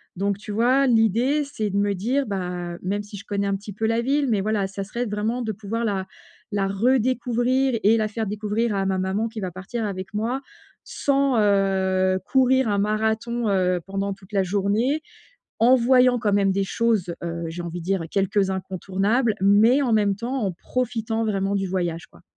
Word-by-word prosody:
Donc 200 Hz, +1 st, -1 dB
tu 210 Hz, 0 st, -8 dB
vois, 255 Hz, +5 st, +3 dB
l'idée, 235 Hz, +6 st, +3 dB
c'est 220 Hz, -7 st, -3 dB
de 195 Hz, -, -5 dB
me 200 Hz, 0 st, +2 dB
dire, 255 Hz, +9 st, 0 dB
bah, 180 Hz, -3 st, -4 dB
même 205 Hz, +3 st, -2 dB
si 205 Hz, 0 st, -10 dB
je -, -, -11 dB
connais 200 Hz, -1 st, -1 dB
un 200 Hz, -, 0 dB
petit 205 Hz, 0 st, -9 dB
peu 220 Hz, +2 st, -2 dB
la 230 Hz, +1 st, +1 dB
ville, 280 Hz, +2 st, +1 dB
mais 210 Hz, -3 st, +2 dB
voilà, 205 Hz, -2 st, 0 dB
ça 195 Hz, 0 st, -5 dB
serait 235 Hz, +4 st, -3 dB
vraiment 215 Hz, +4 st, -2 dB
de 220 Hz, -2 st, -2 dB
pouvoir 220 Hz, +3 st, -4 dB
la 195 Hz, -3 st, -2 dB, 0.5 s
la 195 Hz, -1 st, +1 dB
redécouvrir 250 Hz, +3 st, +1 dB
et 220 Hz, +3 st, +5 dB
la 215 Hz, -1 st, +1 dB
faire 220 Hz, +1 st, -3 dB
découvrir 210 Hz, +2 st, -1 dB
à 195 Hz, -1 st, 0 dB
ma 190 Hz, -1 st, 0 dB
maman 195 Hz, +4 st, -1 dB
qui 220 Hz, -2 st, -7 dB
va 185 Hz, -2 st, -3 dB
partir 205 Hz, +6 st, -5 dB
avec 190 Hz, 0 st, -5 dB
moi, 235 Hz, +6 st, -1 dB, 0.4 s
sans, 275 Hz, -3 st, +1 dB
heu 190 Hz, -2 st, +2 dB
courir 260 Hz, -2 st, +3 dB
un 200 Hz, -, +1 dB
marathon, 220 Hz, +2 st, 0 dB
heu, 180 Hz, -2 st, +1 dB
pendant 195 Hz, 0 st, -2 dB
toute 195 Hz, +1 st, -18 dB
la 195 Hz, -1 st, +2 dB
journée, 205 Hz, -, 0 dB, 0.6 s
en 245 Hz, +3 st, +6 dB
voyant 250 Hz, 0 st, +4 dB
quand 210 Hz, -2 st, 0 dB
même 195 Hz, -1 st, +3 dB
des 195 Hz, 0 st, +1 dB
choses, 205 Hz, -4 st, 0 dB
heu, 170 Hz, 0 st, -4 dB
j'ai 170 Hz, +2 st, -5 dB
envie 175 Hz, +1 st, -5 dB
de -, -, -10 dB
dire, 190 Hz, -3 st, 0 dB
quelques 195 Hz, 0 st, +1 dB
incontournables, 195 Hz, +5 st, 0 dB
mais 215 Hz, +8 st, +5 dB
en 250 Hz, -4 st, 0 dB
même 205 Hz, -2 st, +2 dB
temps 245 Hz, +6 st, -3 dB
en 190 Hz, -, 0 dB
profitant 225 Hz, +1 st, -2 dB
vraiment 200 Hz, -1 st, 0 dB
du 195 Hz, -1 st, -1 dB
voyage, 175 Hz, -2 st, -2 dB
quoi. -, -, -21 dB
210 Hz, 195 wpm, -23 LUFS, 195-235 Hz, 0.6 s, en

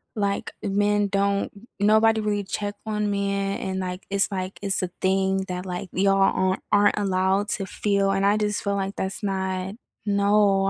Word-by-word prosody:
like, 200 Hz, -1 st, -1 dB
men 205 Hz, 0 st, +2 dB
don't 200 Hz, 0 st, 0 dB, 0.3 s
m 205 Hz, -, +3 dB
nobody 220 Hz, +1 st, +5 dB
really 205 Hz, -1 st, 0 dB
check 205 Hz, +1 st, -4 dB
on 210 Hz, -1 st, -1 dB
men," 200 Hz, 0 st, -1 dB
and, 190 Hz, 0 st, -3 dB
like 180 Hz, 0 st, -4 dB
it's, 200 Hz, +1 st, +1 dB
like 185 Hz, 0 st, -4 dB
it's 195 Hz, -2 st, -1 dB
a 180 Hz, -, -1 dB
thing 190 Hz, 0 st, +1 dB
that, 180 Hz, 0 st, -4 dB
like, 180 Hz, 0 st, -5 dB
y'all 195 Hz, -1 st, +3 dB
a -, -, -3 dB
aren't 205 Hz, 0 st, +4 dB
allowed 190 Hz, +1 st, +1 dB
to 195 Hz, -, -2 dB
feel, 200 Hz, 0 st, +1 dB
and 195 Hz, 0 st, +1 dB
I 205 Hz, +1 st, +4 dB
d 210 Hz, -, +1 dB
just 205 Hz, -, -3 dB
feel, 200 Hz, -1 st, 0 dB
like, 195 Hz, 0 st, -2 dB
that's 190 Hz, +2 st, -4 dB
not 190 Hz, 0 st, -2 dB, 0.3 s
no, 200 Hz, -1 st, +3 dB
200 Hz, 185 wpm, -24 LUFS, 190-205 Hz, 0.3 s, nobody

